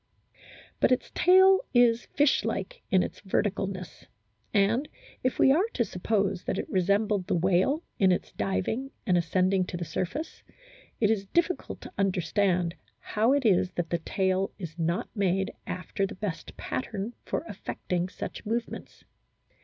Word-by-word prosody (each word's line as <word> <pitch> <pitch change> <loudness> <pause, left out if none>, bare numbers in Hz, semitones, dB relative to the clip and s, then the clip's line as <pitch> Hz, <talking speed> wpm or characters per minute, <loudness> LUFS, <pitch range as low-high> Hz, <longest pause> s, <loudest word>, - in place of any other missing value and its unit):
But - - +3
its 255 - +1
tail 380 +1 +6 0.2
is 240 -1 +4
fish 290 -1 +4
like - - -3
in 185 -1 +4
its - - -6
verticalness; 190 -3 -2 0.4
and, 220 +7 +2 0.3
if 255 - 0
we 270 - +6
are 350 +10 +3
to 235 - +2
suppose 195 0 -1
that - - -1
it - - -3
resembled 200 +1 +1
the - - +1
whale 190 - +2 0.2
in 190 -2 +5
its 180 - -1
diving 100 - -2 0.2
and 185 -5 +3
ascending 185 +2 +2
to 180 - -5
the 170 - -4
surface, 235 - -4 0.6
it 215 -2 +3
is 200 -3 -1
difficult 345 - -1
to - - -10
understand 185 -2 +1 0.2
how 220 +4 +1
it 280 -3 +1
is 185 -3 +3
that 175 -1 -3
the 170 - +1
tail 190 +2 0
is 170 -5 -6
not 170 +2 0
made 195 -2 +1 0.2
after 185 +2 -2
the - - -9
best 190 -3 -5
pattern 220 -2 -4
for - - -2
affecting 180 0 -3
such - - -7
movements. 230 +2 -4
195 Hz, 155 wpm, -28 LUFS, 180-235 Hz, 0.6 s, tail